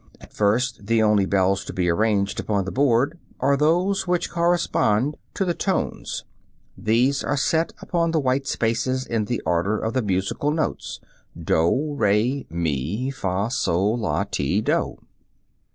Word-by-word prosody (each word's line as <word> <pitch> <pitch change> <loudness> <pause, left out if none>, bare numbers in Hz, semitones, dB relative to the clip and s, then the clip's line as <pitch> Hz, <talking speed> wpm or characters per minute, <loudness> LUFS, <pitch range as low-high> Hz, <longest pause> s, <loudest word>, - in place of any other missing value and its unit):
(Fig. - - -25
27.) - - -14
At - - -24
first 110 +1 0
the 115 -1 +3
only 105 -2 +3
bells 95 0 +2
to - - -7
be 90 -1 0
arranged 100 +2 +1
upon 100 -3 -1
the 95 - -4
board 140 +4 +2 0.2
are 140 +2 +3
those 175 +7 +1
which 180 -1 0
correspond 170 -7 +1 0.2
to 195 - 0
the 175 - 0
tones; 190 +2 -2 0.5
these 125 +6 +1
are 145 - -1
set 160 +5 +1
upon 170 -1 0
the 165 -1 +1
white 135 0 0
spaces 130 +2 0
in 110 -2 -1
the 120 +3 -2
order 90 +6 +1
of 110 +2 -2
the 130 - +1
musical 100 +7 -1
notes, 155 +1 -2 0.4
doh, 135 - +1
re, 120 +2 +1
mi, 85 - -2
fah, 100 -4 -2
soh, 100 -5 +1
lah, 115 -1 0
ti, 70 +8 -1
doh. 110 - 0
115 Hz, 160 wpm, -23 LUFS, 100-140 Hz, 0.5 s, the